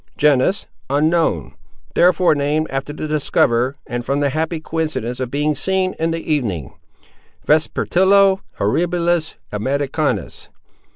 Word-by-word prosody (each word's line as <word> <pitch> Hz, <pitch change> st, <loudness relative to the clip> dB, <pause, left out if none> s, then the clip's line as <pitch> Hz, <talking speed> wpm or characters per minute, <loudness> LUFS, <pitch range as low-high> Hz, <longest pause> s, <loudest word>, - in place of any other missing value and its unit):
Genus—unknown; 150 Hz, -, +1 dB, 0.4 s
therefore 180 Hz, -1 st, +4 dB
named 150 Hz, +2 st, 0 dB
after 135 Hz, +2 st, -3 dB
the 155 Hz, +1 st, -5 dB
discoverer, 135 Hz, -4 st, +1 dB
and 120 Hz, 0 st, -4 dB
from 140 Hz, +3 st, -1 dB
the 140 Hz, -1 st, +1 dB
happy 160 Hz, +2 st, -2 dB
coincidence 155 Hz, -7 st, -3 dB
of 130 Hz, -2 st, -3 dB
being 150 Hz, +3 st, 0 dB
seen 185 Hz, +5 st, 0 dB
in 165 Hz, +1 st, +1 dB
the 165 Hz, -1 st, -2 dB
evening—_Vespertilio 160 Hz, -, 0 dB, 0.2 s
Horribilis, 170 Hz, -, 0 dB, 0.2 s
Americanus. 140 Hz, +7 st, -2 dB
150 Hz, 105 wpm, -19 LUFS, 135-165 Hz, 0.4 s, therefore